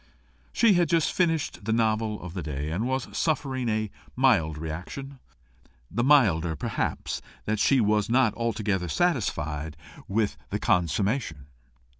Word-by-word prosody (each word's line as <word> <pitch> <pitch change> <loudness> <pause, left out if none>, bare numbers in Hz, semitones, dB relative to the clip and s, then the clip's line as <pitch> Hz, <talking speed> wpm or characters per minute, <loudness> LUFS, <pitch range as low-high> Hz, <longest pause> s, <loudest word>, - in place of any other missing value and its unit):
She 230 -3 +4
had 175 -3 +2
just 165 -2 +2
finished 165 - 0
the 110 - 0
novel 110 -1 +1
of 85 -2 -7
the 90 - -4
day, 75 0 -4
and 105 +9 -1
was 130 0 -3
suffering 135 -6 0
a 110 -1 -1 0.2
mild 100 - +3
reaction 90 - -6 0.7
the 120 +4 0
milder, 95 - +4
perhaps, - - -3 0.2
that 110 0 -1
she 135 +5 +4
was 105 -1 +2
not 120 -2 +3
altogether 105 -5 -1
satisfied 80 - -1 0.3
with 105 +1 0
the - - -1
consummation. 90 - 0
110 Hz, 135 wpm, -26 LUFS, 85-130 Hz, 0.7 s, She